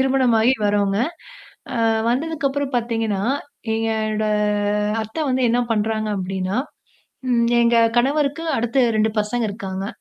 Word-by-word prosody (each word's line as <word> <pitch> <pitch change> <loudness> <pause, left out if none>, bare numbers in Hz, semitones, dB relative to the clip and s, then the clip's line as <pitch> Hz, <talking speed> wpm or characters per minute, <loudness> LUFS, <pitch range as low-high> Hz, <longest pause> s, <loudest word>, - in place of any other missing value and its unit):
திருமணமாகி 260 -3 +3
வரோங்க. 205 -1 +1 0.8
அ - - -2 0.3
வந்ததுக்கப்புறம் 285 0 -1
பார்த்தீங்கன்னா, 225 -4 -1 0.5
என்னோட 220 -1 -1 0.8
அத்தை 220 +8 -6
வந்து 260 0 +1
என்ன 240 +1 +2
பண்றாங்க 215 0 0
அப்படின்னா 190 +1 -2 0.7
ம். 235 -1 +3
எங்க 235 0 +4 0.2
கணவருக்கு, 285 +4 +1
அடுத்து 240 +3 +1 0.2
2 215 0 +2
பசங்க 220 +2 -1
இருக்காங்க. 195 -2 -5
225 Hz, 110 wpm, -21 LUFS, 210-260 Hz, 0.8 s, எங்க